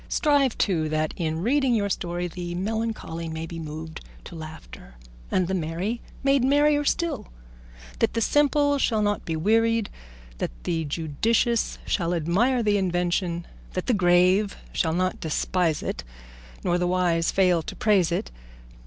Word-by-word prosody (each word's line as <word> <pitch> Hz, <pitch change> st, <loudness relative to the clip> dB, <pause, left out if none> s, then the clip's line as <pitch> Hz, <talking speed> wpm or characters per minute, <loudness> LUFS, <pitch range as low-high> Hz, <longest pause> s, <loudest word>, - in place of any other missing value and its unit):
Strive, 285 Hz, -5 st, +2 dB
too, 160 Hz, -6 st, +1 dB
that 155 Hz, 0 st, -1 dB
in 160 Hz, -1 st, -2 dB
reading 260 Hz, +1 st, +2 dB
your 205 Hz, -2 st, +1 dB
story 175 Hz, -2 st, -2 dB
the 175 Hz, 0 st, -6 dB
melancholy 200 Hz, -5 st, -3 dB
may 160 Hz, 0 st, -4 dB
be 165 Hz, 0 st, -7 dB
moved 160 Hz, +1 st, -7 dB, 0.2 s
to -, -, -11 dB
laughter, 155 Hz, -, -10 dB, 0.3 s
and 185 Hz, -2 st, +1 dB
the 190 Hz, -, -2 dB
merry 185 Hz, +7 st, -2 dB, 0.2 s
made 275 Hz, -1 st, +3 dB
merrier 290 Hz, +2 st, +4 dB
still; 335 Hz, +3 st, -1 dB, 0.7 s
that -, -, +1 dB
the -, -, +2 dB
simple 285 Hz, +3 st, +3 dB
shall 220 Hz, -5 st, +2 dB
not 205 Hz, 0 st, 0 dB
be 165 Hz, -, -2 dB
wearied, 225 Hz, +5 st, +2 dB, 0.5 s
that -, -, -1 dB
the 165 Hz, -2 st, -1 dB
judicious 210 Hz, -, 0 dB
shall 175 Hz, -2 st, 0 dB
admire 215 Hz, +10 st, +2 dB
the 210 Hz, -1 st, +3 dB
invention, 175 Hz, -2 st, 0 dB, 0.3 s
that 185 Hz, -, -2 dB
the 250 Hz, -, +2 dB
grave 185 Hz, +1 st, +3 dB, 0.2 s
shall 160 Hz, -2 st, +1 dB
not 185 Hz, +1 st, 0 dB
despise 165 Hz, +1 st, 0 dB
it, -, -, -4 dB, 0.6 s
nor 175 Hz, 0 st, +1 dB
the 180 Hz, -, +1 dB
wise 175 Hz, -2 st, +1 dB
fail 180 Hz, -3 st, +3 dB
to -, -, -7 dB
praise 195 Hz, -6 st, +3 dB
it. 115 Hz, -, -2 dB
180 Hz, 155 wpm, -25 LUFS, 165-225 Hz, 0.7 s, merrier